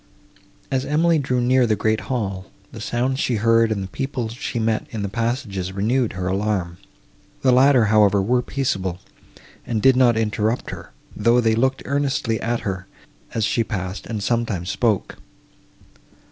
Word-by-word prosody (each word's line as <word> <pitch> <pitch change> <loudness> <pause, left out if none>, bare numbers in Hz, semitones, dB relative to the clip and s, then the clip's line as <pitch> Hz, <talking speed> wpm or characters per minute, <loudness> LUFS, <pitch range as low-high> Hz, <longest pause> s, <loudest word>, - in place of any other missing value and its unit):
As 130 -1 0
Emily 160 +3 +2
drew 130 -2 0
near 125 0 +3
the 110 - +2
great 110 +1 0
hall, 100 -7 -2 0.2
the 110 - -9
sounds 125 +4 -1
she 125 - 0
heard 115 +1 +3
and 100 -3 -1
the - - -5
people 130 +1 -3
she 120 +2 -5
met 110 -1 0
in 110 -3 -4
the - - -1
passages 105 -4 -2
renewed 115 +5 0
her 90 -1 -4
alarm. 95 -3 -1 0.6
The 130 - +5
latter, 130 -1 +5
however, 105 -2 +4
were 120 +6 +2
peaceable, 95 -11 -2 0.6
and 115 -2 -2
did 130 +4 +5
not 125 -3 +4
interrupt 110 +1 -1
her, - - -9 0.3
though 115 +3 +3
they 115 -2 +2
looked 130 +4 0
earnestly 135 -5 -1
at 120 +1 -1
her, 95 -2 -4 0.5
as 110 -2 +1
she 115 +2 +1
passed, 95 -3 -5
and 110 -3 -4
sometimes 105 -6 -1
spoke. 105 0 0
115 Hz, 160 wpm, -22 LUFS, 100-125 Hz, 0.6 s, The